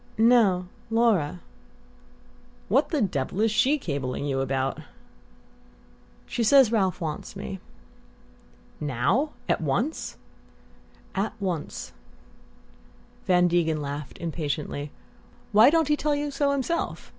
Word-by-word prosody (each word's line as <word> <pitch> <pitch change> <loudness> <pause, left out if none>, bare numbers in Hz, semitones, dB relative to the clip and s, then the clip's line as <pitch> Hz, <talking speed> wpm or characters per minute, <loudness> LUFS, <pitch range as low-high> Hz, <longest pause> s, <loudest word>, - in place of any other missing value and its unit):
"No. 220 -6 +4 0.2
Laura." 210 -9 +2 1.3
"What - - +3
the 300 -8 +1
devil 165 -1 -2
is 225 0 +3
SHE 260 +7 +3
cabling 140 - -3
you 135 -2 -1
about?" 135 0 -1 1.5
"She 235 - -2
says 260 0 +6
Ralph 195 -5 +1
wants 155 +2 -5
me." 195 -1 -6 1.2
"Now 150 - 0
at - - +1
once?" 195 - -2 1.0
"At 200 +3 -1
once." 180 -6 -4 1.3
Van 180 -1 +4
Degen 165 -3 +1
laughed 145 0 -6
impatiently. 150 -3 -3 0.6
"Why 220 +4 +7
don't 325 -1 +2
he 300 - +3
tell 295 0 0
you 290 0 -2
so 280 0 +1
himself? 280 +5 -2
190 Hz, 110 wpm, -26 LUFS, 150-250 Hz, 1.5 s, Why